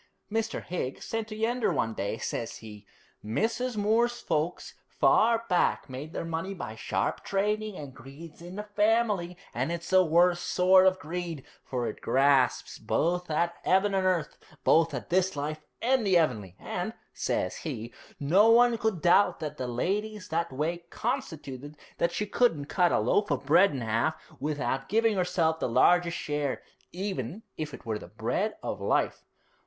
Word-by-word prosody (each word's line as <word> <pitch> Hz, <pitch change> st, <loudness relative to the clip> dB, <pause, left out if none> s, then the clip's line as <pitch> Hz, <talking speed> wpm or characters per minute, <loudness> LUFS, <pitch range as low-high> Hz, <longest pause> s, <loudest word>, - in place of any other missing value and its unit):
Mr. 225 Hz, 0 st, -2 dB
Higgs 155 Hz, -7 st, -4 dB
said 225 Hz, -1 st, -3 dB
to 215 Hz, -, -7 dB
Yeander 225 Hz, 0 st, 0 dB
one 115 Hz, -8 st, 0 dB
day, 100 Hz, +1 st, -3 dB
says 115 Hz, -, -4 dB
he, 105 Hz, -2 st, -12 dB, 0.4 s
"Mrs. 225 Hz, -, -1 dB
Moore's 230 Hz, +4 st, +2 dB
folks 155 Hz, +3 st, -2 dB
far 230 Hz, +1 st, +3 dB
back 180 Hz, -, +1 dB
made 140 Hz, +5 st, -6 dB
their 170 Hz, -, -4 dB
money 165 Hz, +4 st, -3 dB
by 110 Hz, -, -6 dB
sharp 100 Hz, -3 st, -2 dB
trading, 210 Hz, +1 st, -1 dB
and 140 Hz, -3 st, -8 dB
greed's 140 Hz, +7 st, -12 dB
in 175 Hz, +2 st, -9 dB
the 210 Hz, -, -4 dB
family, 210 Hz, -4 st, +1 dB, 0.2 s
and -, -, -1 dB
it's 170 Hz, +1 st, -5 dB
the 185 Hz, 0 st, +6 dB
worst 175 Hz, +1 st, +3 dB
sort 185 Hz, +1 st, +5 dB
of 185 Hz, 0 st, +3 dB
greed, 170 Hz, -3 st, -5 dB, 0.2 s
for 125 Hz, -2 st, -3 dB
it -, -, -6 dB
grasps 135 Hz, -1 st, +2 dB
both 180 Hz, +1 st, 0 dB
at 170 Hz, +2 st, +1 dB
'eaven 195 Hz, +2 st, +3 dB
and 190 Hz, -1 st, +2 dB
earth, 180 Hz, -4 st, -1 dB, 0.2 s
both 165 Hz, 0 st, +4 dB
at -, -, -7 dB
this 185 Hz, 0 st, +2 dB
life 150 Hz, +2 st, -3 dB, 0.2 s
and 255 Hz, 0 st, +3 dB
the 190 Hz, -3 st, +4 dB
'eavenly. 105 Hz, -, 0 dB
And," -, -, -4 dB, 0.2 s
says -, -, -1 dB
he, 115 Hz, +2 st, -6 dB, 0.3 s
"no 185 Hz, +10 st, +5 dB
one 235 Hz, 0 st, +5 dB
could 220 Hz, -8 st, -1 dB
doubt 180 Hz, +3 st, +4 dB
that 150 Hz, -1 st, -5 dB
the 130 Hz, -, -3 dB
lady's 205 Hz, -, -2 dB
that 170 Hz, 0 st, -1 dB
way 155 Hz, +6 st, -2 dB
constituted 155 Hz, -, -4 dB, 0.2 s
that 170 Hz, -, +2 dB
she 210 Hz, +4 st, -2 dB
couldn't 205 Hz, -10 st, +1 dB
cut 175 Hz, +3 st, +2 dB
a -, -, +3 dB
loaf 125 Hz, -, +1 dB
of 140 Hz, -2 st, -1 dB
bread 170 Hz, +7 st, +6 dB
in 135 Hz, -4 st, -4 dB
'alf 115 Hz, +8 st, 0 dB, 0.2 s
without 135 Hz, -2 st, -2 dB
giving 225 Hz, 0 st, +3 dB
herself 175 Hz, -3 st, +1 dB
the -, -, -1 dB
largest 170 Hz, +8 st, +4 dB
share, 145 Hz, -2 st, -2 dB, 0.3 s
even 185 Hz, -, -4 dB
if 155 Hz, -1 st, -4 dB
it -, -, -11 dB
were 110 Hz, -2 st, -2 dB
the -, -, -11 dB
bread 125 Hz, -, -2 dB
of -, -, -4 dB
life."' -, -, 0 dB
170 Hz, 170 wpm, -28 LUFS, 140-205 Hz, 0.4 s, the